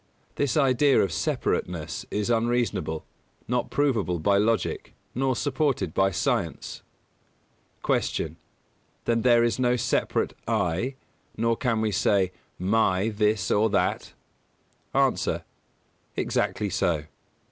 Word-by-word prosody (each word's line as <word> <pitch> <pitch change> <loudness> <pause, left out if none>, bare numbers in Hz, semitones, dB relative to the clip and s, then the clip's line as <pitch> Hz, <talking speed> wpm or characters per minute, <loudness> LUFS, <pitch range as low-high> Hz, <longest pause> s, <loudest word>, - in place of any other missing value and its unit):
This 140 -2 0
idea 140 0 +4
of 95 - +2
separateness 80 0 -2
is 105 +3 -1
unreasonable, 115 -8 0 0.4
not 125 +1 0
provable 115 - +1
by 100 +5 +2
logic, 115 +2 0 0.2
nor 130 0 +1
supported 130 - 0
by 95 0 +3
science. 95 - -2 1.0
231. - - 0
Q. - - -16 0.7
Then 115 -1 +2
there 120 -1 +5
is 120 +2 +1
no 125 -1 +3
separate 125 0 0
"I," 95 +11 0 0.4
nor 115 +1 +2
can 115 -2 0
we 110 -1 +1
say 95 -2 +2 0.3
"my" 95 +1 +2
this 105 -2 +1
or 110 +2 +3
that? 100 - 0 0.8
A. - - +1 0.7
Exactly 105 -2 -1
so. 85 -4 +1
110 Hz, 115 wpm, -26 LUFS, 95-125 Hz, 1.0 s, there